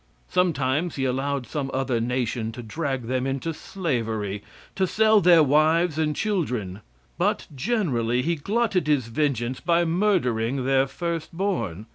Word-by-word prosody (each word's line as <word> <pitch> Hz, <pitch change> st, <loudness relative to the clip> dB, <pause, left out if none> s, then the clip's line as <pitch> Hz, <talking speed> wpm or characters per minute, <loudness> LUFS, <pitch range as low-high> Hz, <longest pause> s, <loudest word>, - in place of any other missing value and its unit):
Sometimes 160 Hz, -2 st, +1 dB
he 135 Hz, -, -1 dB
allowed 135 Hz, +1 st, -1 dB
some 140 Hz, -1 st, -3 dB
other 130 Hz, -3 st, 0 dB
nation 120 Hz, -2 st, -1 dB
to 120 Hz, +1 st, -8 dB
drag 135 Hz, +2 st, -3 dB
them 130 Hz, +2 st, -1 dB
into 135 Hz, +5 st, -2 dB
slavery 115 Hz, -, -3 dB, 0.3 s
to 190 Hz, -1 st, +1 dB
sell 220 Hz, +1 st, +4 dB
their 170 Hz, -3 st, +6 dB
wives 155 Hz, +3 st, +3 dB
and 150 Hz, -1 st, 0 dB
children; 125 Hz, -, -2 dB, 0.4 s
but -, -, +1 dB
generally 125 Hz, -, 0 dB
he 170 Hz, +3 st, +1 dB
glutted 195 Hz, +1 st, 0 dB
his 135 Hz, -6 st, +1 dB
vengeance 125 Hz, -2 st, -1 dB
by 170 Hz, 0 st, +2 dB
murdering 140 Hz, -, +1 dB
their 135 Hz, 0 st, +3 dB
first 170 Hz, +1 st, -4 dB
born. 165 Hz, -, -2 dB
140 Hz, 140 wpm, -24 LUFS, 125-170 Hz, 0.4 s, their